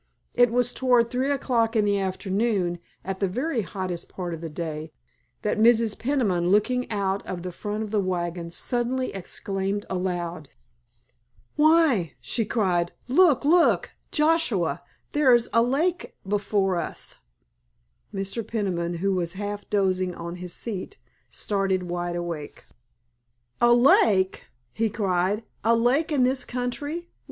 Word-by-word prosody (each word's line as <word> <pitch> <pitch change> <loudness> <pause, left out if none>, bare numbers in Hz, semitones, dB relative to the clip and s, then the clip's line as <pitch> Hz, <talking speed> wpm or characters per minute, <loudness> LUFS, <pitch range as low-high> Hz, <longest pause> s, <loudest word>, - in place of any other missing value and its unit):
It 245 -1 +5
was 245 +1 +1
toward 245 -3 +3
three 260 +2 0
o'clock 240 -5 +1
in 215 -2 +3
the 200 -1 +2
afternoon, 190 -1 -1 0.3
at 190 0 -4
the 195 - +1
very 250 - -1
hottest 185 -3 -5
part 175 -2 -5
of 165 - -6
the 165 - -5
day, 155 -1 -5 0.5
that 210 - 0
Mrs. 225 -1 +4
Peniman 215 -10 0
looking 250 +6 +2
out 200 -2 -1
of 175 -2 -5
the 180 - -4
front 210 +4 -4
of 210 - -7
the 215 - +2
wagon 175 -2 -2
suddenly 245 +7 -2
exclaimed 195 +1 -3
aloud. 175 -4 -3 1.1
"Why," 300 - +4
she 210 - -1
cried, 180 -6 0
"look, 290 0 +4
look, 335 +3 +4 0.2
Joshua, 300 - +2 0.3
there 275 -4 +5
is 240 -1 0
a 230 - +5
lake 305 +9 0
before 200 -2 +1
us!" - - -5 0.9
Mr. 195 +3 -3
Peniman, 175 -6 -2
who 195 +3 0
was 175 -2 -1
half 205 +1 -5
dozing 185 -3 +1
on 170 +1 -6
his 180 0 -7
seat, 225 - -5 0.3
started 195 -2 -1
wide 175 0 -3
awake. 170 -4 -5 1.0
"A 240 - +6
lake?" 220 -6 +4 0.3
he 225 0 0
cried. 195 +1 0 0.2
"A 230 +2 +4
lake 260 +8 +2
in 280 -4 +3
this 260 +1 +2
country? 290 +7 -4
205 Hz, 140 wpm, -25 LUFS, 180-245 Hz, 1.1 s, A